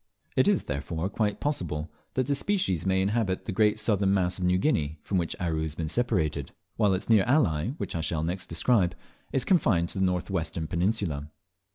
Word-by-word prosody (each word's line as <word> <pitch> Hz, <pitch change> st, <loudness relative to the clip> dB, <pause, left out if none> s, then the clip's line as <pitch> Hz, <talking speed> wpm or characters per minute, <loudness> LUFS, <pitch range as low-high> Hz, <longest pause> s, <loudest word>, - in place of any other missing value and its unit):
It -, -, +4 dB
is -, -, +3 dB
therefore 80 Hz, +5 st, -3 dB
quite 105 Hz, 0 st, -1 dB
possible 85 Hz, -, -2 dB, 0.2 s
that 130 Hz, -, +1 dB
this 140 Hz, +1 st, 0 dB
species 100 Hz, -, 0 dB
may 95 Hz, 0 st, +2 dB
inhabit 100 Hz, -2 st, 0 dB
the -, -, -3 dB
great 105 Hz, +2 st, +3 dB
southern 100 Hz, -3 st, +2 dB
mass 90 Hz, -1 st, 0 dB
of -, -, -3 dB
New 90 Hz, 0 st, +3 dB
Guinea, 80 Hz, -, 0 dB
from 95 Hz, -, 0 dB
which 85 Hz, -, -2 dB
Aru 80 Hz, -3 st, -1 dB
has 80 Hz, -1 st, -3 dB
been 80 Hz, -1 st, -3 dB
separated; 80 Hz, -, 0 dB, 0.2 s
while 105 Hz, -4 st, +3 dB
its 95 Hz, -, -3 dB
near 110 Hz, -4 st, +5 dB
ally, 100 Hz, -, +2 dB
which -, -, -4 dB
I 85 Hz, -, -1 dB
shall 80 Hz, 0 st, -1 dB
next 90 Hz, +3 st, -3 dB
describe, 90 Hz, +2 st, +2 dB, 0.4 s
is 130 Hz, -, 0 dB
confined 100 Hz, -, +3 dB
to 95 Hz, -, -4 dB
the 95 Hz, -, +3 dB
north 90 Hz, +1 st, -1 dB
western 80 Hz, -2 st, -2 dB
peninsula. 85 Hz, -4 st, -1 dB
95 Hz, 200 wpm, -27 LUFS, 80-105 Hz, 0.4 s, near